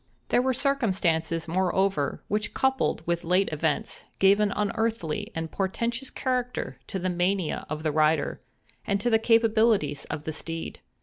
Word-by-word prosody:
There 245 - +4
were 260 +1 +1
circumstances, 185 - 0
moreover, 185 -3 0
which 210 +1 -2
coupled 265 -10 +1
with 170 0 -1
late 180 +3 +2
events, 155 0 -2
gave 195 +1 +5
an 210 -1 +2
unearthly 210 -5 -1
and 165 0 -3
portentous 230 +6 -2
character 250 -2 -2
to 195 - -3
the 185 0 -2
mania 180 -1 0
of 155 +1 -4
the 155 - +1
rider, 155 0 +2 0.4
and 200 -1 0
to 240 +4 0
the 225 - +5
capabilities 220 -9 +3
of 150 -1 -5
the 155 - -4
steed. 165 +1 -5
190 Hz, 150 wpm, -27 LUFS, 160-225 Hz, 0.4 s, gave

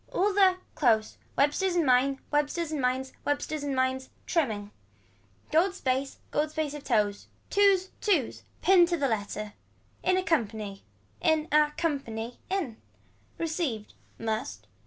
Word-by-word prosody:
All 400 +2 +2
the, 380 -2 +5 0.2
close. 220 -6 +2 0.2
Websters 345 +6 +2
and 340 -3 +3
mines, 260 +1 +4
websters 295 +2 0
and 300 -3 -2
mines. 255 +1 0
Websters 290 +1 -1
and 280 -2 -1
mines. 260 0 0 0.2
Trimming. 215 - -1 0.8
Gold 360 +4 +3
space 265 -4 -1
gold 300 +1 +1
space 310 -2 -2
of 295 -1 -7
toes. 210 -5 0 0.2
Twos, 395 -2 +4
twos. 350 - +1 0.2
Pinned 365 -2 +6
to 345 0 0
the 280 -3 +1
letter. 210 -2 -3 0.5
In 370 0 +2
accompany. 220 - -1 0.4
In 315 -1 +2
a 300 0 +5
company 245 -8 -3
in. 345 - -2 0.6
Received. 310 - -2 0.2
Must. 215 - -3
285 Hz, 135 wpm, -28 LUFS, 230-335 Hz, 0.8 s, Pinned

